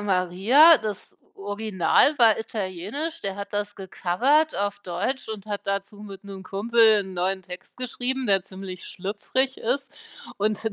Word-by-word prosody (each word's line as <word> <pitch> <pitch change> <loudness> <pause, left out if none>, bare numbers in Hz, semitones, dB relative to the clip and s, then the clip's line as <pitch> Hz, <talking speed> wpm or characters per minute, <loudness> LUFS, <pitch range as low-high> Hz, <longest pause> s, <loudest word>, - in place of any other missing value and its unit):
Maria“. 205 - +5
Das 210 -3 -6 0.2
Original 205 - +1
war 225 -3 +6
italienisch, 220 - -4
der 195 -1 -3
hat 200 +1 -7
das 205 0 -2
gecovert 230 - +1
auf 205 0 -2
Deutsch 200 +10 -3
und 215 -2 -7
hat 205 -1 -4
dazu 200 +1 -3
mit 195 -2 -10
'nem 195 -1 -9
Kumpel 220 +2 +4
'n 190 -1 -10
neuen 190 +2 -1
Text 180 0 -10
geschrieben, 255 +1 -2
der 195 -3 +2
ziemlich 190 -1 -8
schlüpfrig 215 +8 -2
ist, 270 +4 -2 0.4
und 210 0 0
205 Hz, 145 wpm, -24 LUFS, 190-235 Hz, 0.4 s, war